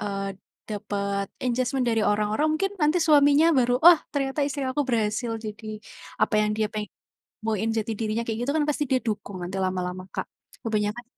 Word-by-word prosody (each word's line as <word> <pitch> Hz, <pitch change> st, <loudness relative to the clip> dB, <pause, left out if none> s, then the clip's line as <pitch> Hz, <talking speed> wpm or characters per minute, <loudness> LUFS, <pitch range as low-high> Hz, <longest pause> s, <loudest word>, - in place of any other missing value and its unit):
eee, 195 Hz, -1 st, -3 dB, 0.3 s
dapat 200 Hz, -2 st, -3 dB, 0.2 s
engagement 255 Hz, +1 st, 0 dB
dari 225 Hz, -2 st, +1 dB
orang-orang 210 Hz, +7 st, +1 dB
mungkin 390 Hz, +4 st, -1 dB
nanti 300 Hz, +3 st, +3 dB
suaminya 305 Hz, 0 st, +5 dB
baru, 245 Hz, -3 st, +3 dB
"Wah 345 Hz, -2 st, +9 dB
ternyata 275 Hz, 0 st, -2 dB
istri 280 Hz, -1 st, -3 dB
aku 265 Hz, +1 st, -1 dB
berhasil 225 Hz, 0 st, 0 dB
jadi 215 Hz, 0 st, -8 dB, 0.5 s
apa -, -, +1 dB
yang 210 Hz, -, +1 dB
dia 215 Hz, -1 st, +1 dB
peng 210 Hz, -1 st, -4 dB, 0.5 s
boin 220 Hz, 0 st, -1 dB
jati 225 Hz, 0 st, -1 dB
dirinya." 220 Hz, +1 st, -1 dB
Kayak 225 Hz, -1 st, -2 dB
gitu 280 Hz, -, 0 dB
kan 310 Hz, -1 st, +2 dB
pasti 295 Hz, 0 st, 0 dB
dia 260 Hz, -, +3 dB
dukung 205 Hz, -5 st, -4 dB
nanti 180 Hz, +2 st, -5 dB
lama-lama 185 Hz, 0 st, -3 dB
Kak. -, -, -4 dB, 0.3 s
Kebanyakan 215 Hz, +1 st, -2 dB
225 Hz, 170 wpm, -25 LUFS, 210-270 Hz, 0.5 s, Wah